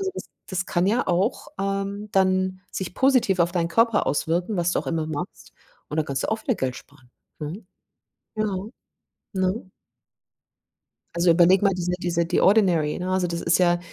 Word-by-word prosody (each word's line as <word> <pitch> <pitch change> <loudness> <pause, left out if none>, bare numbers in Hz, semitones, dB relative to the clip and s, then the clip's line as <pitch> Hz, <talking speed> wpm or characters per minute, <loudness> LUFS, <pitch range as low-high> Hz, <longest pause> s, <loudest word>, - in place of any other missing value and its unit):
das - - -7 0.2
das 185 -1 -1
kann 175 0 0
ja 225 +5 +1
auch, 190 +7 0
ähm, 195 +1 -3
dann 185 -1 +2
sich 180 -2 -4
positiv 255 -8 +3
auf 170 0 +2
deinen 170 -2 0
Körper 225 +4 +2
auswirken, 175 +8 0
was 175 0 +1
du - - +1
auch - - -4
immer 160 -2 -1
machst, 155 -2 -6 0.4
und 150 - -5
dann 155 - +1
kannst 135 -1 -2
du - - -2
auch 220 0 -2
wieder 250 - 0
Geld 130 -8 -2
sparen, 130 -3 -16 0.3
ne? 160 +8 -6 0.7
Ja, 215 0 0 0.9
ne? 190 +1 -1 1.5
Also, 170 0 +4
überleg 175 +3 +5
mal 200 -1 +4
diese 180 -1 -2
diese 170 -2 0
die 175 - +1
Ordinary, 180 -7 +3
ne? 180 - -4
Also, 185 -1 +1
das 170 0 -3
ist 165 - +2
ja, 175 -1 +3
180 Hz, 175 wpm, -24 LUFS, 170-195 Hz, 1.5 s, überleg